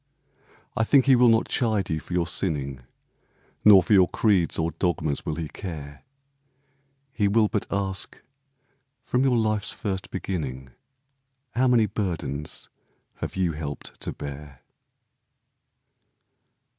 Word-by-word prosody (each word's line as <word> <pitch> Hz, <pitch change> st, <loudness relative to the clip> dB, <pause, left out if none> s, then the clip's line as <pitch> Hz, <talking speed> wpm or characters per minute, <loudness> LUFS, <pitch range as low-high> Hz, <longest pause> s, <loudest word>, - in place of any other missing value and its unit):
I 110 Hz, -, +2 dB
think 135 Hz, +3 st, +4 dB
he 135 Hz, -2 st, +6 dB
will 125 Hz, 0 st, +5 dB
not 115 Hz, 0 st, +3 dB
chide 110 Hz, -7 st, 0 dB
you 80 Hz, -, 0 dB
for 90 Hz, -, -9 dB
your 90 Hz, -1 st, +1 dB
sinning, 75 Hz, -6 st, -1 dB, 0.8 s
Nor 100 Hz, -3 st, +8 dB
for 105 Hz, -, +1 dB
your 95 Hz, -3 st, +6 dB
creeds 100 Hz, -6 st, +2 dB
or 80 Hz, 0 st, 0 dB
dogmas 80 Hz, -3 st, -1 dB
will 80 Hz, -, -1 dB
he 80 Hz, -1 st, -4 dB
care; 75 Hz, -6 st, -8 dB, 1.1 s
He 105 Hz, -5 st, +1 dB
will 105 Hz, +2 st, +3 dB
but 105 Hz, -, -2 dB
ask, 100 Hz, -1 st, -2 dB, 0.8 s
"From 125 Hz, +1 st, 0 dB
your 130 Hz, -3 st, +3 dB
life's 110 Hz, -2 st, 0 dB
first 95 Hz, -2 st, -4 dB
beginning 70 Hz, -9 st, -4 dB, 0.8 s
How 130 Hz, +2 st, +2 dB
many 120 Hz, -3 st, +4 dB
burdens 80 Hz, -9 st, -3 dB, 0.5 s
have -, -, -5 dB
you 90 Hz, -3 st, +1 dB
helped 75 Hz, -2 st, -7 dB
to -, -, -2 dB
bear?" 70 Hz, -2 st, -9 dB
95 Hz, 130 wpm, -25 LUFS, 75-110 Hz, 1.1 s, Nor